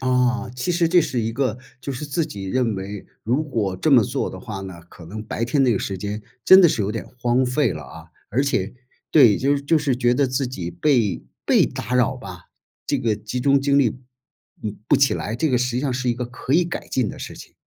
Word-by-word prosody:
啊， 125 -2 +1
其 175 +8 -1
实 170 -1 +2
这 175 +1 +5
是 125 -6 -1
一 115 +1 -2
个 125 -2 -1 0.2
就 140 +2 -4
是 130 +4 -5
自 150 +2 -1
己 100 -1 -7
认 115 +2 0
为， 100 +1 -6 0.2
如 125 +7 +1
果 105 -9 -2
这 155 - 0
么 130 -5 +7
做 - - -2
的 - - -8
话 95 - -6
呢， 95 -3 -8
可 85 - -13
能 105 +6 -7
白 110 +1 -3
天 135 +3 +1
那 125 -3 +4
个 100 - 0
时 95 - -3
间 105 +3 -4 0.2
真 190 +1 +9
的 175 - +7
是 110 - 0
有 100 - -1
点 115 0 -5
荒 125 +2 +2
废 125 -4 +1
了 75 -1 -7
啊， - - -12 0.2
而 135 - +1
且 110 -6 -1 0.4
对， 125 -10 +6
就 140 +2 +2
是 140 - -5
就 160 +3 +3
是 140 -4 0
觉 120 -1 +2
得 140 +2 +2
自 130 +1 -1
己 90 -9 -5
被 120 - +1 0.2
被 - - +4
打 125 +4 -4
扰 125 +1 +2
吧， 90 -9 -10 0.4
这 - - 0
个 115 -2 +1
集 110 +4 -5
中 140 +1 +3
精 140 0 +3
力， 125 -3 +1 0.6
嗯， 105 -1 -4
不 - - +5
起 135 -1 +3
来， 110 +3 -3
这 160 +4 +1
个 125 - +2
实 125 0 0
际 125 - 0
上 140 -3 -1
是 125 0 -2
一 - - 0
个 125 +1 -4
可 125 +2 -5
以 175 +4 +4
改 170 - -5
进 125 -6 0
的 - - -8
事 - - -7
情。 - - -13
125 Hz, 270 characters per minute, -22 LUFS, 105-140 Hz, 0.6 s, 真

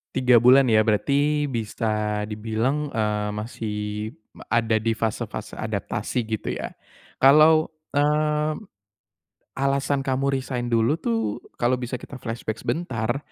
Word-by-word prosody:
3 125 -3 +4
bulan 130 +2 +7
ya 110 -2 +4
berarti 145 +7 +1
bisa 115 -2 -3 0.4
dibilang, 115 +7 -2
eee, 105 -1 -1
masih 105 0 -5 0.8
ada 115 -1 +2
di 110 +1 +1
fase-fase 110 -1 -3
adaptasi 120 -3 -3
gitu 110 -1 -3
ya, - - -5 0.4
kalau, 155 +4 +6 0.2
eee, 150 +1 +1 1.0
alasan 140 +1 +1
kamu 135 +1 +1
resign 125 -2 -4
dulu 115 +4 +3
tuh 115 -9 -2 0.2
kalau 120 +1 +2
bisa 125 0 -4
kita 135 - -10
flashback 115 -2 -4
sebentar 120 -7 -2
125 Hz, 115 wpm, -24 LUFS, 110-140 Hz, 1.0 s, bulan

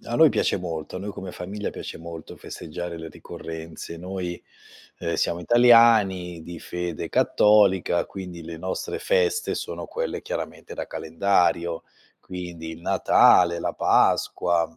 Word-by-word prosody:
a 120 - -4
noi 160 +4 +7
piace 100 - +1
molto, 80 -3 -5
a - - -3
noi 100 +2 -5
come 95 -2 -7
famiglia 100 +4 -5
piace - - -7
molto 85 -1 -9
festeggiare 85 +1 -7
le 80 0 -7
ricorrenze, 80 +1 -8
noi, 90 0 -5 0.6
ehm, - - -2
siamo 85 - 0
italiani 110 -6 +5
di 85 +1 -8
fede 90 -2 -4
cattolica, 95 -5 +3
quindi 90 -3 -8
le 80 0 -8
nostre 95 +3 -4
feste 460 -3 +1
sono - - -5
quelle - - -3
chiaramente - - -6
da - - -5
calendario: 85 0 0 0.4
quindi 85 -3 -7
il 80 +1 -11
Natale, 85 0 +5
la - - -2
Pasqua 85 -2 +2
90 Hz, 140 wpm, -24 LUFS, 85-100 Hz, 0.6 s, noi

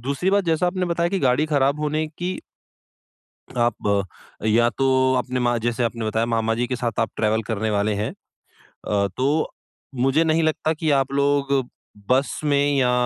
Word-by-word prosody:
दूसरी 140 +9 -1
बात 200 -1 +2
जैसा 165 +2 +1
आपने 180 0 -1
बताया 170 0 +1
कि 195 +1 -1
गाड़ी 135 +4 +2
खराब 140 0 +1
होने 155 +1 -1
की 180 +1 -2 1.3
आप 105 -4 +1 0.4
या 120 +2 +4
तो 130 -1 +3
आपने 125 0 -2
मा 120 -1 +1
जैसे 120 +1 -1
आपने 115 -1 -2
बताया 110 +2 0
मामा 115 -1 0
जी 120 +1 -1
के 125 - -2
साथ 120 -3 -2
आप 115 - 0
ट्रैवल 110 +1 +1
करने 110 0 -2
वाले 105 +1 +1
हैं। 105 +2 -2 0.8
अ, 100 -1 +2
तो 145 +5 +1 0.4
मुझे 135 +6 +2
नहीं 160 +1 +2
लगता 155 0 +1
कि 155 0 -2
आप 135 0 0
लोग 140 0 +1 0.6
बस 130 +2 +1
में 145 0 +2
या 125 -2 +3
130 Hz, 175 wpm, -22 LUFS, 115-150 Hz, 1.3 s, या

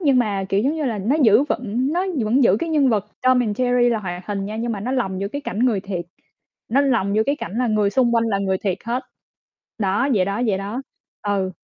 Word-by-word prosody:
nhưng 280 -7 +3
mà, 205 -5 0
kiểu, 195 +1 +2
giống 280 +7 +1
như 310 -2 -2
là 225 -5 -1
nó 235 +10 +1
giữ 225 +1 +6
vững 250 +5 -1
nó 365 +3 0 0.2
vẫn 245 +4 +3
giữ 195 - +5
cái 335 - -3
nhân 290 -4 +3
vật 210 -3 +1 0.2
Tom 255 0 +4
and 220 0 -2
Jerry 245 -1 +3
là 230 - +1
hoạt 180 -3 -6
hình 200 -1 -3
nha. 215 +2 -5
Nhưng 230 +1 -2
mà 200 - -4
nó 250 +5 -3
lồng 195 -8 -1
giữa 200 - -2
cái 285 - -5
cảnh 255 -7 -5
người 235 -5 +2
thiệt, 185 -3 -4 0.6
nó 265 +5 +3
lồng 230 -8 +1
vô 220 - +4
cái 280 +1 +1
cảnh 200 - -6
là 250 - +1
người 215 -2 +2
xung 240 +1 +2
quanh 230 0 +3
là 200 -3 0
người 190 -1 0
thiệt 195 -3 -2
hết. 240 +3 -2 0.8
Đó, 205 +7 +1
vậy 185 -3 +3
đó, 200 +4 -2
vậy 195 -3 +1
đó. 210 +7 -4 0.4
Ừ, 200 -2 -1
220 Hz, 260 wpm, -21 LUFS, 200-255 Hz, 0.8 s, giữ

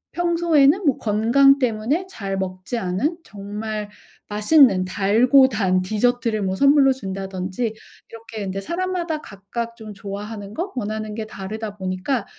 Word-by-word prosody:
평소에는 340 -1 +3
뭐 275 - +3
건강 235 +6 +4
때문에 250 +9 0
잘 195 - -4
먹지 185 +5 -4
않은 230 - -1
정말 210 0 -6 0.4
맛있는 210 -3 +4
달고 230 +8 +4
단 190 -5 +1
디저트를 220 +2 0
뭐 190 0 -1
선물로 275 +1 +5
준다든지 195 0 -4 0.4
이렇게 225 -2 -8
근데 195 0 -4
사람마다 345 - -2
각각 230 +3 -6
좀 215 -2 -9
좋아하는 205 +1 -7
거 365 +4 -3
원하는 215 -2 -4
게 220 -1 -4
다르다 210 +1 -6
보니까 190 +6 -2
220 Hz, 300 characters per minute, -22 LUFS, 195-270 Hz, 0.4 s, 선물로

